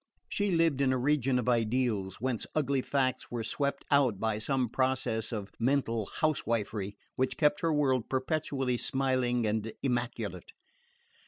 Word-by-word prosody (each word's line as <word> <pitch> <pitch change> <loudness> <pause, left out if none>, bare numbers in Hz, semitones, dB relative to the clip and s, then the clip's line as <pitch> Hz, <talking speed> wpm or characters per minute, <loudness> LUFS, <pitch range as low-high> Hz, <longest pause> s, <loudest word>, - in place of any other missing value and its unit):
She 205 0 0
lived 165 -6 +2
in 135 -1 +3
a 130 - +2
region 135 -1 +2
of 125 - -1
ideals, 115 -5 +1
whence 125 -1 -2
ugly 140 -3 +1
facts 130 -1 0
were 120 -2 -3
swept 140 +4 -2
out 130 -8 +4
by 110 -1 0
some 130 +2 0
process 120 -2 0
of 105 -3 -4
mental 115 -4 +1
housewifery 115 -9 0 0.2
which 130 -1 0
kept 150 -1 +3
her 165 - +1
world 135 -5 +1
perpetually 135 -2 0
smiling 130 -2 +1
and 110 +1 -1
immaculate. 120 -2 -2
130 Hz, 145 wpm, -30 LUFS, 115-140 Hz, 0.2 s, out